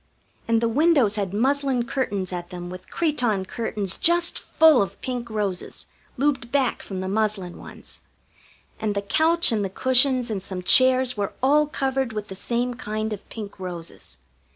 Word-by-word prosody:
And 230 0 +2
the 230 - +2
windows 270 -4 +3
had 200 -3 -2
muslin 265 +3 +1
curtains 205 -8 -2
at 175 -1 -5
them 175 0 -7
with 185 0 -10
cretonne 245 - 0
curtains 205 -3 -3
just 345 0 +3
full 315 -5 +5
of 195 - -4
pink 245 -2 -4
roses, 205 -4 -3 0.3
looped 265 -3 0
back 270 -3 +1
from 190 -2 -6
the 185 - -4
muslin 200 -3 -1
ones; - - -10 0.8
and 215 -2 -1
the 200 - -1
couch 325 - +3
and 215 -3 0
the 195 - -2
cushions 255 +2 +3
and 200 -3 -2
some 185 -1 -6
chairs 255 +4 +5
were 205 -2 -3
all 295 +3 +4
covered 265 -4 -1
with 210 -1 -5
the 190 - -7
same 240 +5 -1
kind 215 -2 -3
of 205 - -10
pink 205 -3 -8
roses. 175 -3 -7
230 Hz, 170 wpm, -24 LUFS, 200-265 Hz, 0.8 s, full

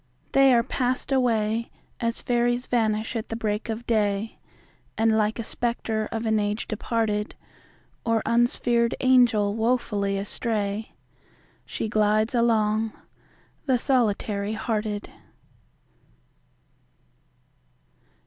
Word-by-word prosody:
They 275 -1 +6
are 235 -2 +4
past 255 +3 -2
away 230 -3 +1 0.3
As 230 0 -2
Fairies 240 +1 +1
vanish 220 -1 0
at 225 - -3
the 225 - -3
break 215 0 -2
of 225 +2 -4
day; 210 -2 0 0.6
And 225 0 +3
like 215 0 +1
a 230 - -3
spectre 220 -2 -2
of 225 0 -3
an 220 -1 +2
age 210 +2 -2
departed, 215 -1 -1 0.7
Or 230 -1 +1
unsphered 235 0 +2
Angel 240 -6 +4
wofully 220 -3 0
astray, 205 +1 -3 0.7
She - - -3
glides 215 +1 +2
along—the 225 +3 -1
solitary 215 -5 0
hearted. 215 -2 -3
225 Hz, 100 wpm, -25 LUFS, 210-235 Hz, 0.7 s, They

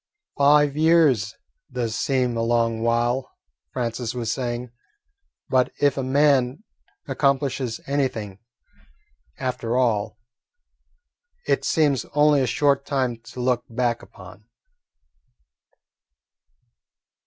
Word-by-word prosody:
"Five 145 0 +4
years 155 - +3 0.4
does 120 -3 -2
seem 125 -2 0
a 115 - -1
long 115 -1 +1
while," 120 +2 0 0.3
Francis 120 -1 -3
was 115 -2 -2
saying, 120 -2 -4 0.8
"but 130 -1 +2
if 145 -2 +3
a 135 - -2
man 135 -1 +2 0.4
accomplishes 135 -4 0
anything, 120 -8 -2 1.0
after 125 -2 -2
all, 110 -4 0 1.3
it - - +1
seems 145 -7 +1
only 150 -1 +4
a 130 - +1
short 140 +3 +2
time 130 -4 -1
to 125 - -10
look 125 -1 +1
back 120 0 -1
upon." 95 +2 -14
125 Hz, 95 wpm, -23 LUFS, 115-140 Hz, 1.3 s, Five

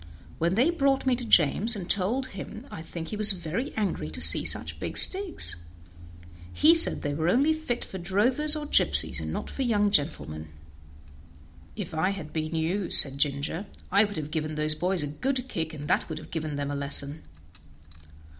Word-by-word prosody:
When 170 +3 -1
they 260 +10 +2
brought 275 -5 -1
me 260 -1 +1
to 245 - -7
James 220 +3 +2
and 185 -4 -8
told 230 +9 0
him 215 +5 -10
I - - -9
think 165 0 -9
he - - -6
was 210 -1 +6
very 180 - -6
angry 210 -3 -3
to - - -7
see - - +9
such - - +1
big - - -6
sticks. 380 - -1 0.9
He 315 +2 +4
said 335 0 +4
they 145 - -3
were 160 +3 -2
only 280 - +1
fit 315 -7 -5
for 190 - -9
drovers 245 - 0
or 300 -1 -6
gypsies, - - +5
and - - -6
not - - -6
for - - -7
young 210 -5 0
gentlemen." 80 - -2 1.3
"If 190 -6 -8
I 160 +4 -1
had 185 -6 -8
been 155 0 -5
you," 175 +4 -3
said 135 -1 +4
Ginger, 145 +6 -3 0.2
"I 200 +3 +4
would 205 -1 -5
have 155 -1 -7
given 155 -1 -4
those 155 0 -1
boys 180 +2 -1
a - - -4
good 255 - -4
kick, 160 -9 -5
and 145 -2 -9
that - - -1
would 160 - -6
have 155 0 -12
given 155 -2 -5
them 145 0 -5
a - - -5
lesson." 140 +1 0
185 Hz, 190 wpm, -25 LUFS, 155-240 Hz, 1.3 s, see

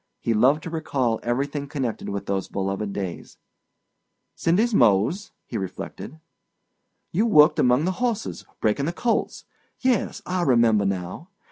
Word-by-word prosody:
He 115 - 0
loved 130 +8 +3
to 165 - -6
recall 135 -8 -1
everything 140 +4 -2
connected 130 -6 -3
with 100 0 -4
those 95 -1 -2
beloved 95 +1 -3
days. 95 -4 -6 1.0
"Cindy's 215 +8 +1
Mose," 125 - +3
he 115 - -4
reflected. 100 - -7 0.9
"You 210 +7 +2
worked 150 -8 +6
among 125 +5 +3
the 185 - +1
horses—breaking 200 - -2
the 170 - -2
colts. 235 +5 -1 0.3
Yes, 255 -5 0
I 180 0 -1
remember 115 -8 +3
now. 95 - -4
130 Hz, 130 wpm, -24 LUFS, 105-170 Hz, 1.0 s, worked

